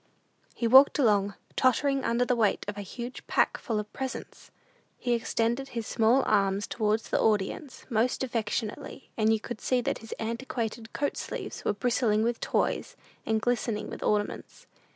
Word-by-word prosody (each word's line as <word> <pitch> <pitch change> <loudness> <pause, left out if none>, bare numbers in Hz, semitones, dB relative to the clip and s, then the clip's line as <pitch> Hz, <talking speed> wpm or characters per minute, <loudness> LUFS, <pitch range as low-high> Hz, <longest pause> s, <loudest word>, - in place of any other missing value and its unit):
He 235 - -2
walked 265 +4 +7
along, 205 -6 +3 0.2
tottering 275 +2 +2
under 235 +1 +1
the 250 - +2
weight 220 -4 +1
of 205 - -3
a 205 - -5
huge 240 +5 -7
pack - - +2
full 225 -5 -2
of 210 0 -7
presents. 265 -1 -6 0.5
He 245 - 0
extended 235 +2 0
his 230 -3 -4
small 230 +6 +3
arms 200 -1 +2
towards 215 0 -1
the - - +2
audience 215 +6 -1
most 240 +2 +1
affectionately, 230 +1 -3
and 220 -1 +3
you 220 - +2
could 230 +1 -7
see 255 - +2
that - - -2
his 225 - -8
antiquated 230 -1 -4
coat 285 - -2
sleeves - - -5
were - - +1
bristling 220 -1 +1
with 235 0 0
toys - - -1 0.3
and 220 0 +2
glistening 220 -2 -1
with - - -7
ornaments. 210 -1 -2
230 Hz, 165 wpm, -28 LUFS, 215-250 Hz, 0.5 s, walked